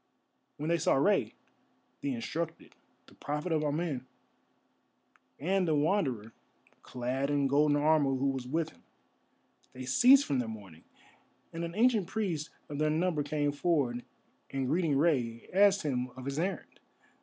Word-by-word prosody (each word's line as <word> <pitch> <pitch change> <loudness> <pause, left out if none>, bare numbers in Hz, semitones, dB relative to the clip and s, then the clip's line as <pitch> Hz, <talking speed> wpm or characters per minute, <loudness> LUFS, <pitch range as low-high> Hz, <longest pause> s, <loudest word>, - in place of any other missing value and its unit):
When 150 +2 -3
they 170 0 +2
saw 160 - +3
Rei, 195 +9 +2 0.7
the 280 -2 -2
instructed, 170 -8 -5 0.3
the - - -19
Prophet 150 +4 -4
of 155 -1 +1
Amen, 145 -4 -2 1.3
and 185 +5 +1
the 155 - +2
Wanderer 145 - 0 0.5
clad 130 +3 -3
in 145 -1 +1
golden 145 +2 +3
armour 145 -2 +3
who 135 +1 +1
was 130 -2 -5
with 160 +3 -1
him, - - -24 0.9
they 130 0 -7
ceased 255 - +6
from 135 - 0
their 120 - -2
mourning, 100 -7 -10 0.7
and 165 +1 -4
an 170 +1 -5
ancient 220 -4 +3
priest 180 -9 -2 0.2
of 145 -1 -6
their 155 0 +2
number 160 0 +1
came 145 0 0
forward, 140 -6 0 0.5
and, 135 -1 -2
greeting 155 -1 +1
Rei, 125 -7 0
asked 200 0 +4
him 125 -4 -1
of 130 0 -9
his 140 +2 -3
errand. 190 +4 -4
150 Hz, 150 wpm, -31 LUFS, 135-170 Hz, 1.3 s, ceased